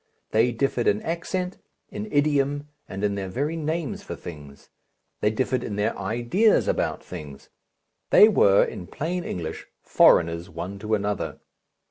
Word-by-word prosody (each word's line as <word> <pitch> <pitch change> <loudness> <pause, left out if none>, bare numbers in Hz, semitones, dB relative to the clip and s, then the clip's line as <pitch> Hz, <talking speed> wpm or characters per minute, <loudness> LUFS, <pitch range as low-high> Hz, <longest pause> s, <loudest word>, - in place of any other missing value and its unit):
They 115 +3 +3
differed 120 0 0
in 105 0 +3
accent, 180 +2 -3 0.3
in 215 0 -6
idiom, 145 0 +1 0.2
and 95 +1 -5
in 105 -1 +1
their 100 -1 -3
very 145 - -2
names 165 +6 -3
for 200 - -7
things. 75 -4 -11 0.5
They 105 - +2
differed 125 +2 -1
in 105 - -4
their 105 +3 0
ideas 120 - +2
about - - -1
things. 75 -6 -9 0.6
They 210 - +8
were, 100 - +5
in 90 - -6
plain 175 +4 -3
English, 80 - -5 0.2
foreigners 85 +1 +4
one 100 +2 -6
to 110 +1 0
another. 105 -1 -3
115 Hz, 145 wpm, -25 LUFS, 100-155 Hz, 0.6 s, They